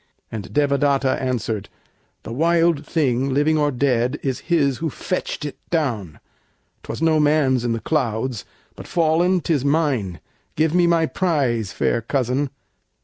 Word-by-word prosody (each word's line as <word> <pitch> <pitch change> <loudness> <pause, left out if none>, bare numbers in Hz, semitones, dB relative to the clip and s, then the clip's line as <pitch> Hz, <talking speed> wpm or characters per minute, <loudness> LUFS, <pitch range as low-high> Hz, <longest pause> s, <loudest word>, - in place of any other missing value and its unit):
And 110 -3 -6
Devadatta 140 -2 +2
answered, 115 -5 -2 0.5
"The 115 - -6
wild 165 +1 +2
thing, 135 -4 +1
Living 150 +4 +2
or 150 -1 +2
dead, 125 0 0
is 135 -2 -1
his 140 -6 +2
who 160 0 -1
fetched 180 -1 -4
it 145 - -6
down; 115 - -2 0.6
'Twas - - -5
no 160 -1 +4
man's 145 -4 +3
in 120 -1 0
the 115 - -2
clouds, 120 -5 -1 0.3
but - - -10
fallen 170 +2 +2
'tis 150 -6 0
mine. 140 - 0 0.4
Give 155 +1 +1
me 175 -1 +4
my 165 -1 +3
prize, 135 - 0
fair 120 - 0
cousin." 130 +3 -1
140 Hz, 145 wpm, -21 LUFS, 125-160 Hz, 0.6 s, no